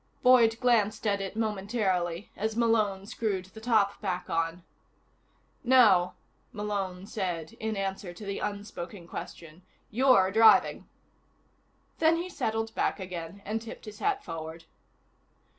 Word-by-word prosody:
Boyd 235 -3 +6
glanced 220 -3 +2
at 200 -2 +1
it 195 +1 -5
momentarily 200 -4 -1
as 220 +1 -2
Malone 215 -5 +2
screwed 205 -3 -2
the 205 +4 -13
top 220 -4 +2
back 180 -3 -3
on. 165 +1 -1 1.0
"No," 225 -9 +5 0.4
Malone 200 -4 -3
said 175 -6 -4
in 220 -1 -2
answer 195 -1 -3
to 190 +4 -10
the 200 0 -3
unspoken 200 -3 -6
question. 165 0 -9 0.3
"You're 215 -6 +4
driving." 225 +2 +5 1.1
Then 320 +1 +4
he 350 +2 -4
settled 225 -8 -2
back - - 0
again 180 +1 -7
and 220 +2 -2
tipped 230 - -9
his 210 -1 -10
hat 415 -1 0
forward. 160 - -7
205 Hz, 125 wpm, -29 LUFS, 185-225 Hz, 1.1 s, Boyd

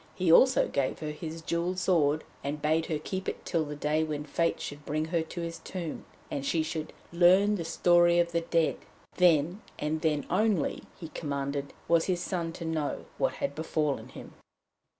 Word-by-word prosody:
He 180 -3 +2
also 260 +10 +6
gave 135 -2 -1
her 155 -1 -4
his 160 +1 -7
jewelled 170 +3 -1
sword, 155 -5 +2 0.2
and 145 +2 -3
bade 155 +2 +1
her 155 - -1
keep 190 +5 -4
it - - -7
till 165 -3 +1
the 150 0 -6
day 150 +2 +1
when 150 -2 -3
Fate 165 +3 0
should 145 0 -6
bring 155 +1 -1
her 165 +1 0
to 165 +2 -6
his 165 0 -5
tomb, 175 -4 -6 0.3
and 140 - -2
she 160 +3 +1
should 155 -1 -4 0.2
'learn 185 +4 +5
the 185 -5 -2
story 175 +1 +4
of 170 0 +2
the 170 0 +1
dead.' 165 -1 +1 0.4
Then, 175 +2 +3 0.2
and 155 +1 -2
then 150 -3 +1
only, 200 -3 +1 0.2
he 165 -4 -7
commanded, 140 -2 -3 0.2
was 170 -1 +4
his 180 -2 0
son 175 -2 -2
to 170 - -7
know 160 -2 -2
what - - +2
had 280 - -3
befallen 155 -2 -1
him. - - -11
165 Hz, 190 wpm, -29 LUFS, 150-175 Hz, 0.4 s, also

